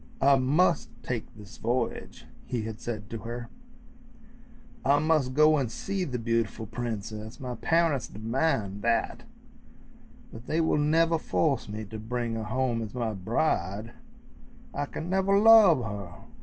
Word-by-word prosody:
" - - -25
I 140 0 +6
must 145 +7 +2
take 120 -3 -4
this 105 +1 -12
voyage," 125 +2 -3 0.2
he 120 -3 -2
had 110 0 -6
said 105 -3 -5
to 115 - -4
her; 120 +1 -6 0.7
" 235 +1 -25
I 140 +1 +4
must 150 -4 +1
go 155 0 +5
and 125 -5 -2
see 195 +5 -3
the 125 -5 -3
beautiful 115 -1 -1
princess; 110 0 -5
my 125 -3 -5
parents 160 0 +1
demand 110 -3 -1
that, 115 +1 0 1.1
but 115 +2 -11
they 160 - 0
will 160 -2 +2
never 165 +2 +3
force 140 -9 0
me 105 +1 -5
to 110 +2 -8
bring 120 +1 -3
her 110 -1 -3
home 125 0 0
as 110 +1 -6
my 115 -3 -1
bride; 105 - -1 0.8
I 145 - -2
can 160 - -6
never 190 +2 +2
love 205 - +7
her! 100 -4 -6
125 Hz, 155 wpm, -28 LUFS, 110-155 Hz, 1.1 s, love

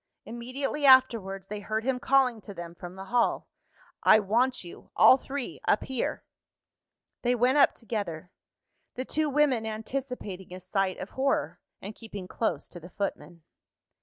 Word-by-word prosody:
Immediately 255 +5 -4
afterwards 230 -8 +4
they 210 +1 -5
heard 215 +2 -3
him 260 0 0
calling 255 -4 +2
to 200 -1 -10
them 170 -1 -7
from 175 +1 -10
the 190 0 -8
hall. 240 -1 +2 0.5
"I - - +7
want 235 +5 +1
you, 175 - -12
all - - +8
three, 275 -1 -6
up - - +3
here." 260 -3 -3 1.0
They 245 0 +2
went 250 +4 +3
up 275 - +5
together 190 -8 -5 0.6
the 255 - -4
two 310 +2 0
women 280 -5 +2
anticipating 220 -4 -5
a - - -8
sight 185 +1 -1
of 195 - -7
horror, 270 +1 -1 0.2
and 205 - -6
keeping 205 -5 -9
close 225 - -2
to 175 - -10
the 175 +2 -12
footman. 175 -4 -5
225 Hz, 155 wpm, -28 LUFS, 190-260 Hz, 1.0 s, all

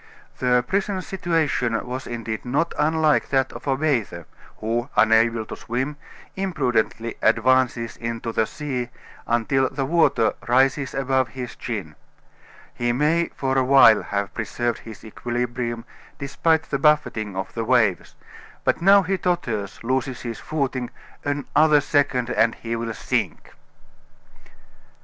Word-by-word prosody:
The 125 -1 +2
prisoner's 195 -1 -1
situation 155 -11 0
was 130 +1 -5
indeed 115 -2 -4
not 145 +7 0
unlike 155 0 +2
that 135 -1 +1
of - - -10
a 135 -1 +1
bather, 120 - -1 0.3
who, 120 +4 -2
unable 115 0 +4
to - - -7
swim, 130 +5 -3 0.4
imprudently 125 - -1
advances 115 0 +2
into 115 0 -4
the 110 0 +1
sea 130 -5 -4 0.4
until 130 +3 +1
the 135 0 -3
water 160 -7 +3
rises 135 +3 +2
above 130 -1 +1
his 125 +1 -7
chin. 100 -10 -5 0.8
He 120 0 0
may 150 +7 +2
for 135 -1 -1
a - - +2
while 130 -4 +7
have 100 -1 -3
preserved 120 0 -2
his 110 -1 -11
equilibrium, 120 +1 -3 0.3
despite 160 +3 +1
the 140 - -3
buffeting 125 -9 +1
of 95 0 -4
the 115 - -2
waves, 110 -6 +1 0.5
but - - +1
now 195 +2 +6
he 190 +1 -1
totters, 115 - -2
loses 130 +1 -1
his 115 -2 -5
footing 135 -5 -2 0.3
another 145 +1 +3
second, 140 -4 +1
and 115 0 +2
he 115 0 -4
will 115 -1 -4
sink! - - -2
125 Hz, 130 wpm, -23 LUFS, 115-145 Hz, 0.8 s, while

